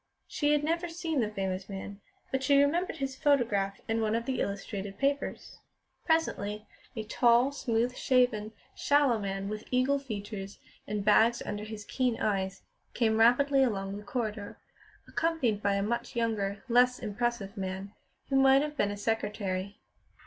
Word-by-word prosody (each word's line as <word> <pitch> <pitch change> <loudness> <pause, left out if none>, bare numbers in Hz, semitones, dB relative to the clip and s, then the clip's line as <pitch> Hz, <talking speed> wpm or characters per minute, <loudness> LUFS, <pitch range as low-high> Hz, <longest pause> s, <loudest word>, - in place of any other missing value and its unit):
She 290 -1 0
had 295 0 +2
never 335 +3 -1
seen 330 -3 -2
the 220 -4 +1
famous 190 -2 -3
man, 200 +1 -7 0.3
but 265 - 0
she 280 +1 +4
remembered 325 +5 +1
his 270 -2 -3
photograph 230 -10 +1
in 225 0 0
one 220 0 +1
of 230 0 -2
the 260 0 -1
illustrated 200 0 -4
papers. 280 +1 -2 0.5
Presently 215 - 0 0.3
a 220 - -3
tall, 240 +4 +3
smooth 245 -2 -1
shaven, 245 -6 +2 0.2
sallow 285 -5 +3
man, 195 -1 -3
with 215 +1 -5
eagle 260 +3 +2
features 205 -5 -6 0.3
and 210 -1 -3
bags 225 +3 +4
under 205 0 -4
his 215 -1 -8
keen 250 -1 0
eyes, 195 -2 -1 0.3
came 220 -2 +2
rapidly 270 +4 +5
along 195 -6 0
the 205 - -9
corridor, 215 -2 -4 0.5
accompanied 270 -11 0
by 200 -1 +1
a 200 - 0
much 235 +4 -3
younger, 210 -4 -1
less 250 +1 +4
impressive 215 -1 -3
man, 190 0 -5 0.4
who 270 - +2
might 270 +1 +6
have 300 0 -4
been 205 -7 +1
a 205 - -4
secretary. 205 -2 -2
225 Hz, 155 wpm, -30 LUFS, 205-265 Hz, 0.5 s, might